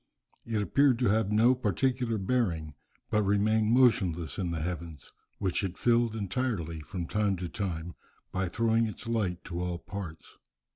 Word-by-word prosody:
It 110 -2 0
appeared 140 +2 +4
to 125 -2 +2
have 105 -1 +2
no 115 +4 +5
particular 125 +1 0
bearing, 95 -8 0 0.4
but 105 - +3
remained 105 +2 +2
motionless 95 - +3
in 90 -2 -1
the 85 -2 -2
heavens, 85 -3 -5 0.3
which 95 +1 -1
it 95 -1 -3
filled 120 -2 +2
entirely 100 -6 -2
from 85 +3 -5
time 105 +1 +1
to 90 0 -4
time, 90 -4 -4 0.4
by 95 -1 -1
throwing 115 +3 +2
its 105 - -7
light 100 -7 -1
to 85 -1 -4
all 90 -1 -2
parts." 85 -2 -8
100 Hz, 155 wpm, -29 LUFS, 85-115 Hz, 0.4 s, no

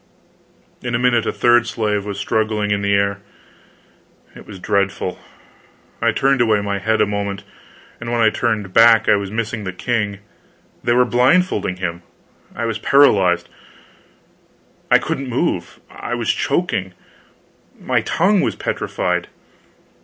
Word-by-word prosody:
In 120 -1 -3
a - - +3
minute 120 -1 +1
a - - +1
third 120 0 +3
slave 105 -3 -1
was 100 -1 -5
struggling 110 0 -1
in 100 0 0
the 100 0 +1
air. 100 0 0 1.2
It - - -13
was 100 - -9
dreadful. 100 -1 -1 0.8
I - - +3
turned 135 -1 +1
away 110 -3 +3
my 100 -1 -2
head 110 +2 +1
a - - +4
moment, 100 -1 -4 0.6
and 120 0 -5
when 120 - 0
I 110 -1 +4
turned 105 -5 -2
back 115 -1 +6
I - - +5
missed 105 +2 -3
the 95 - -4
king! 105 0 -2 0.7
They 120 - +2
were 125 +1 +4
blindfolding 125 - +2
him! 85 -2 -4 0.5
I 120 - -3
was 115 -1 -2
paralyzed; 95 -12 +3 1.4
I - - +7
couldn't 135 -1 -4
move, 120 - -2
I 120 - -5
was 120 -2 0
choking, 115 - -1 0.8
my - - 0
tongue 195 +2 +2
was - - -1
petrified. 90 -1 -2
110 Hz, 140 wpm, -19 LUFS, 100-120 Hz, 1.4 s, I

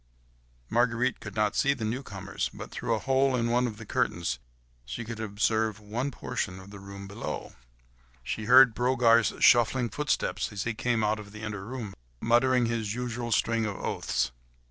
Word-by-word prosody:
Marguerite 120 - +1
could 100 - -8
not 105 -1 +1
see 140 0 +3
the 115 -5 -4
newcomers, 100 -5 -3
but, - - -9
through 115 - -1
a - - -1
hole 135 +3 +2
in 115 -1 0
one 125 +1 +3
of 110 -3 -6
the - - -9
curtains, 75 -8 -1 0.4
she 115 - -6
could 115 0 -6
observe 110 0 0
one 115 +6 -3
portion 115 -8 -4
of 95 +1 -12
the 100 - -9
room 100 0 -9
below. 100 - -5 0.7
She 105 - -4
heard 125 0 +8
Brogard's 120 -2 +4
shuffling 120 +1 +5
footsteps, 145 -4 -1
as 100 0 -3
he 115 - -1
came 115 0 0
out 105 +1 +1
of 100 -1 -11
the 105 - -9
inner 105 -3 -4
room, 110 -3 -6 0.3
muttering 120 +1 +3
his 115 -2 -2
usual 120 -1 -3
string 115 0 +2
of 105 - -4
oaths. - - -1
115 Hz, 175 wpm, -28 LUFS, 105-125 Hz, 0.7 s, heard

